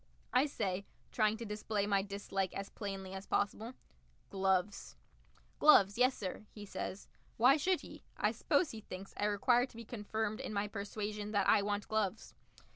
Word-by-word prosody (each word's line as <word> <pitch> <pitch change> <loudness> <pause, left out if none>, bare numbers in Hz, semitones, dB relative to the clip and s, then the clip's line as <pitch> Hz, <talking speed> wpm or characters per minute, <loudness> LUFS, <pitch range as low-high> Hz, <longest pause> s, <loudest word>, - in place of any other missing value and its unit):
I 260 +4 +4
say, 200 -7 -2 0.2
trying 215 -1 +2
to 230 - -6
display 210 -1 -2
my 200 -1 +2
dislike 195 -1 -3
as 195 0 -5
plainly 195 -2 -5
as 190 +1 -7
possible, 220 +5 -1 0.6
"Gloves." 190 +1 0 0.6
"Gloves, 200 -10 +7
yessir," 230 -5 0
he 210 -1 -10
says. 195 0 -5 0.3
Why 250 +4 +7
should 360 +4 +1
he? - - -11
I - - +2
suppose 355 - +1
he 220 - -8
thinks 190 -1 -9
I 205 - -1
require 240 +5 +3
to 230 - -16
be 230 - -8
confirmed 215 -1 -3
in - - -5
my 205 0 0
persuasion 210 0 -4
that 200 -2 +2
I - - +6
want 205 0 -2
gloves. 215 -1 -1
205 Hz, 165 wpm, -34 LUFS, 200-220 Hz, 0.6 s, Gloves